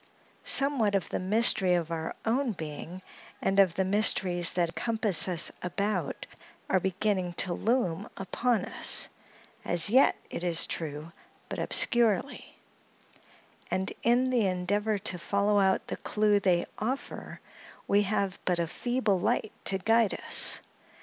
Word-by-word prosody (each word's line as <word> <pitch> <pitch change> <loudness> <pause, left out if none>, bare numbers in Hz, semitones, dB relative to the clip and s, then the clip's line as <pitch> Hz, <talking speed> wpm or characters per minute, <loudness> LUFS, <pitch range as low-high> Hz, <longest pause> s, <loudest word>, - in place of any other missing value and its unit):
Somewhat 270 -8 0
of 195 - -2
the - - -3
mystery 190 -2 +2
of 170 -1 -3
our 160 -1 -5
own 240 +1 0
being, 165 +2 -9 0.4
and 195 +1 0
of 185 -4 +3
the 190 - 0
mysteries 185 -3 +3
that 170 -2 -1
compass 220 -5 +1
us 175 -3 +3
about, 185 -1 -3 0.5
are 190 - +3
beginning 185 -1 -2
to 175 +1 0
loom 215 -5 -2
upon 220 +2 -1
us—as 175 +3 +1
yet, 260 +3 +4 0.2
it 170 - -6
is 170 -2 +1
true, 155 0 -6 0.4
but - - -5
obscurely; 235 +1 0 1.1
and, 190 +1 -3
in 250 +2 +1
the 235 -5 +1
endeavor 205 +4 -1
to 185 -2 -2
follow 200 +3 0
out 190 -1 +1
the - - -6
clew 210 -1 0
they 180 -3 +1
offer, 250 +6 -5 0.5
we 205 - +3
have 200 -2 -2
but 180 -1 0
a 170 - -1
feeble 215 +2 -2
light 210 - -1
to 195 - +2
guide 225 +2 +1
us. - - +7
195 Hz, 135 wpm, -27 LUFS, 180-220 Hz, 1.1 s, us